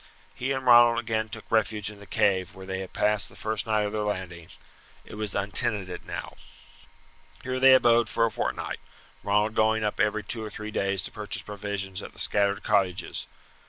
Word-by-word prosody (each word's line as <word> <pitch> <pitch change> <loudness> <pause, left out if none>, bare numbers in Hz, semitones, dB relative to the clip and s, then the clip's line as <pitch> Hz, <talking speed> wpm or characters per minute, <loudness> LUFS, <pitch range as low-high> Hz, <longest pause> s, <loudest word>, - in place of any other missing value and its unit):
He 130 +2 -3
and 130 -1 -2
Ronald 120 -1 +7
again 110 -2 -1
took 110 -1 -8
refuge 105 -1 +1
in 105 - -14
the 100 - -13
cave 95 -3 +1
where 95 0 -10
they 95 0 -4
had 95 -1 -7
passed 105 -1 +1
the - - -17
first 110 +1 -2
night 110 -1 +2
of 105 - -2
their 110 - -1
landing. 95 -5 -4 0.6
It - - -12
was 105 -1 -3
untenanted 100 -1 -1
now. - - -6 1.1
Here 130 0 -2
they 130 0 +8
abode 120 -3 +4
for 115 - +2
a 115 - -1
fortnight, - - -3 0.4
Ronald 105 +2 +1
going 110 0 +2
up 105 - -2
every 105 0 +1
two 110 +3 -5
or 110 - -5
three 105 +1 -7
days 100 -2 0
to - - -3
purchase - - -3
provisions 100 -2 -4
at - - -9
the - - -11
scattered 100 0 +1
cottages. 90 -3 0
105 Hz, 195 wpm, -27 LUFS, 100-110 Hz, 1.1 s, they